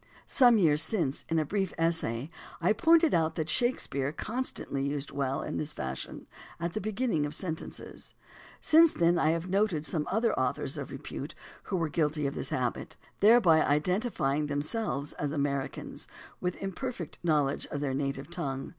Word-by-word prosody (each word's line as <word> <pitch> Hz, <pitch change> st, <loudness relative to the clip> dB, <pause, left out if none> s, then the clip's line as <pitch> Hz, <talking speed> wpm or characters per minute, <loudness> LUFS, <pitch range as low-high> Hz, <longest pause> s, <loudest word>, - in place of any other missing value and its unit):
Some 245 Hz, -4 st, +5 dB
years 155 Hz, -6 st, +4 dB
since, 170 Hz, -11 st, 0 dB
in 165 Hz, -, +1 dB
a 155 Hz, -, +2 dB
brief 195 Hz, +3 st, -2 dB
essay, 165 Hz, -5 st, +1 dB, 0.3 s
I 175 Hz, +5 st, +3 dB
pointed 330 Hz, +4 st, +4 dB
out 160 Hz, -1 st, +2 dB
that 155 Hz, -1 st, -2 dB
Shakespeare 150 Hz, -, +1 dB
con 230 Hz, +11 st, -3 dB
stantly 135 Hz, -, -3 dB
used 140 Hz, 0 st, -2 dB
"well" 140 Hz, -1 st, -1 dB
in 150 Hz, -, -4 dB
this 155 Hz, 0 st, -3 dB
fashion 65 Hz, 0 st, -5 dB, 0.3 s
at 170 Hz, 0 st, -2 dB
the 215 Hz, -, -2 dB
beginning 215 Hz, -6 st, 0 dB
of 150 Hz, -, -5 dB
sentences. 160 Hz, -3 st, -5 dB, 0.4 s
Since 325 Hz, 0 st, +6 dB
then 170 Hz, 0 st, +3 dB
I 155 Hz, -, +3 dB
have 165 Hz, +2 st, -1 dB
noted 190 Hz, -5 st, +1 dB
some 150 Hz, +1 st, 0 dB
other 225 Hz, +4 st, +1 dB
au -, -, +2 dB
thors -, -, -3 dB
of -, -, -6 dB
repute -, -, -7 dB, 0.3 s
who 195 Hz, -, -2 dB
were 165 Hz, -2 st, 0 dB
guilty 150 Hz, -1 st, 0 dB
of 140 Hz, -, -1 dB
this -, -, -3 dB
habit, -, -, -2 dB, 0.2 s
thereby 200 Hz, -7 st, +6 dB
identifying 150 Hz, -, +1 dB
themselves 145 Hz, +1 st, -2 dB
as 145 Hz, -1 st, -3 dB
Americans 140 Hz, -2 st, -3 dB, 0.3 s
with 180 Hz, 0 st, -3 dB
an 195 Hz, -, -3 dB
imper 260 Hz, +6 st, -3 dB
fect 175 Hz, -10 st, -8 dB
knowledge 150 Hz, -5 st, +1 dB
of 145 Hz, -, -4 dB
their 140 Hz, -2 st, -1 dB
native 135 Hz, +2 st, -3 dB
tongue. 135 Hz, -6 st, -3 dB
160 Hz, 175 wpm, -29 LUFS, 145-195 Hz, 0.4 s, Since